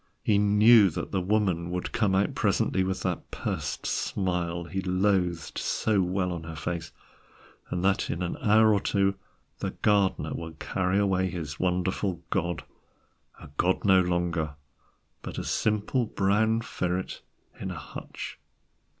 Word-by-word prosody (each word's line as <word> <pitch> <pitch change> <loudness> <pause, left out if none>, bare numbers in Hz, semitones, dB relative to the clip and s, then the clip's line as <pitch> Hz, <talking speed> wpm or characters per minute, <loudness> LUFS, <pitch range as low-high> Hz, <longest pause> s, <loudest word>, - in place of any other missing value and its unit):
He 105 -2 +3
knew 105 +1 +6
that 80 - -5
the 95 - 0
Woman 95 -3 +1
would 90 0 -3
come 100 -4 +1
out 100 +1 +2
presently 95 - +1
with 95 -1 -2
that 90 -3 -2
pursed - - -3
smile 90 -3 -1
he 95 +3 -3
loathed 90 -3 0
so 105 -3 +1
well 90 0 0
on 85 - -5
her 80 0 -7
face, 80 -1 -4 0.8
and 90 +1 -2
that 95 0 +2
in 85 - -2
an 85 - -2
hour 110 +1 +5
or 100 - +3
two 100 0 +1 0.5
the - - -2
gardener 100 -3 +2
would 80 -1 -6
carry 95 +3 0
away 95 -2 +2
his 80 -5 -5
wonderful 90 0 -1
god, 85 -3 -1 0.8
a - - -12
god 95 +3 +1
no 95 -2 +6
longer, 85 -4 -1 0.7
but - - -7
a - - -2
simple 110 +3 0
brown 110 +4 +2
ferret 90 -4 -3 0.4
in - - -4
a - - -5
hutch. - - -8
95 Hz, 150 wpm, -27 LUFS, 85-100 Hz, 0.8 s, knew